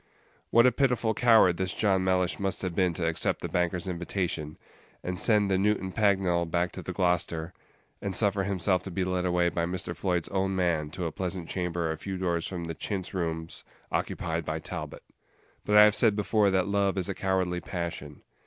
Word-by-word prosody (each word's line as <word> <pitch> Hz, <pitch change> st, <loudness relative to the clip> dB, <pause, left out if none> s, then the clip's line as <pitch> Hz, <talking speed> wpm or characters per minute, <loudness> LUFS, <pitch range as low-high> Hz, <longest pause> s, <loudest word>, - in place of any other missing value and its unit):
What 115 Hz, +1 st, +5 dB
a 125 Hz, -, +6 dB
pitiful 125 Hz, -3 st, +1 dB
coward 110 Hz, -7 st, +5 dB
this 95 Hz, 0 st, -2 dB
John 95 Hz, -3 st, +2 dB
Mellish 90 Hz, -1 st, +1 dB
must 95 Hz, -1 st, -2 dB
have 90 Hz, -2 st, -2 dB
been 90 Hz, 0 st, +2 dB
to 85 Hz, -, -1 dB
accept 80 Hz, -1 st, 0 dB
the -, -, -1 dB
banker's 90 Hz, 0 st, -1 dB
invitation, 85 Hz, -3 st, -3 dB, 0.5 s
and 90 Hz, 0 st, -3 dB
send 105 Hz, -3 st, +3 dB
the 95 Hz, -, +2 dB
Newton 100 Hz, -2 st, +1 dB
Pagnell 95 Hz, -5 st, +2 dB
back 85 Hz, +1 st, 0 dB
to 95 Hz, -, -7 dB
the 90 Hz, -, -5 dB
Gloucester, 90 Hz, -2 st, -1 dB, 0.5 s
and 100 Hz, -2 st, -3 dB
suffer 100 Hz, -1 st, +2 dB
himself 95 Hz, -1 st, +1 dB
to 95 Hz, -, -7 dB
be 95 Hz, +1 st, -2 dB
led 90 Hz, 0 st, -1 dB
away 90 Hz, -1 st, +2 dB
by 85 Hz, 0 st, -1 dB
Mr. 85 Hz, -1 st, -4 dB
Floyd's 90 Hz, -3 st, -1 dB
own 95 Hz, 0 st, 0 dB
man 85 Hz, -5 st, 0 dB
to 90 Hz, +2 st, -5 dB
a 80 Hz, -, -2 dB
pleasant 90 Hz, -1 st, -4 dB
chamber 90 Hz, -3 st, -2 dB
a 80 Hz, -, -5 dB
few 95 Hz, +2 st, -5 dB
doors 85 Hz, -3 st, -1 dB
from 90 Hz, -3 st, -5 dB
the 80 Hz, 0 st, -4 dB
chintz 95 Hz, +3 st, -4 dB
rooms 80 Hz, -3 st, -4 dB, 0.3 s
occupied -, -, -2 dB
by -, -, -3 dB
Talbot! -, -, -7 dB, 0.6 s
But 105 Hz, 0 st, +4 dB
I 105 Hz, -, +10 dB
have 105 Hz, 0 st, +6 dB
said 110 Hz, -1 st, +3 dB
before 105 Hz, 0 st, +2 dB
that 95 Hz, -1 st, +2 dB
love 100 Hz, -1 st, +1 dB
is 90 Hz, -, -1 dB
a 100 Hz, -, -2 dB
cowardly 95 Hz, -2 st, 0 dB
passion. 85 Hz, -2 st, -6 dB
95 Hz, 200 wpm, -28 LUFS, 85-100 Hz, 0.6 s, I